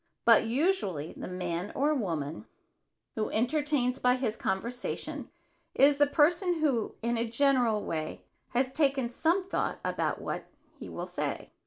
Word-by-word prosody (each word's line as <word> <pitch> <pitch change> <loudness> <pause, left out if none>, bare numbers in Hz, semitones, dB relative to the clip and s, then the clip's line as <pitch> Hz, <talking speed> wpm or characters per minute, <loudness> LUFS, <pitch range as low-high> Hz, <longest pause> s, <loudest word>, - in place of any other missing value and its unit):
But 230 -1 +7
usually 235 - 0
the - - -6
man 180 0 -3
or 290 +3 +2
woman 165 - -3 0.7
who 215 - -2
entertains 255 +1 +1
by 250 0 +4
his 245 -4 -1
conversation 230 +6 -3 0.5
is 280 +1 +6
the 290 0 +5
person 345 +5 +3
who, 280 -9 0
in 235 0 0
a 230 0 -1
general 240 -4 +2
way, 155 -1 -4 0.2
has 255 +1 0
taken 275 -4 +2
some 345 +8 +1
thought - - -1
about - - -1
what - - -4 0.3
he - - -7
shall - - -5
say. - - -4
250 Hz, 145 wpm, -29 LUFS, 215-290 Hz, 0.7 s, But